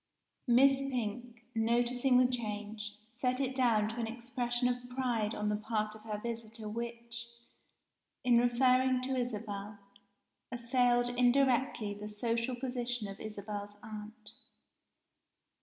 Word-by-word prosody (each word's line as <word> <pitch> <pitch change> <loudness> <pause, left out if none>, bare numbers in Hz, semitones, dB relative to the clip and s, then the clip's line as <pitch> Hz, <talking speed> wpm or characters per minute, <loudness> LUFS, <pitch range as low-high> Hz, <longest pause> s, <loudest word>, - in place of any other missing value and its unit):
Miss 265 +3 +6
Pink, 245 -3 -3
noticing 240 +3 +3
the 255 - +6
change, 210 -3 -3 0.2
set 250 +1 0
it 265 -1 0
down 235 -5 +3
to 225 - -6
an 230 - -1
expression 240 +1 -1
of 245 0 -2
pride 240 -4 0
on 210 - -1
the 210 - +1
part 215 0 -1
of 215 - -12
her 215 -1 -4
visitor 225 0 -5
which, 235 +1 -5 1.0
in 245 -1 +5
referring 255 +1 +4
to 265 +1 -1
Isabel, 210 -4 -3 0.7
assailed 245 0 +2
indirectly 250 -4 +3
the 210 +1 -7
social 230 +3 -1
position 245 -3 -3
of 195 0 -8
Isabel's 205 -1 -6
aunt. 215 0 -8
235 Hz, 125 wpm, -33 LUFS, 215-250 Hz, 1.0 s, Miss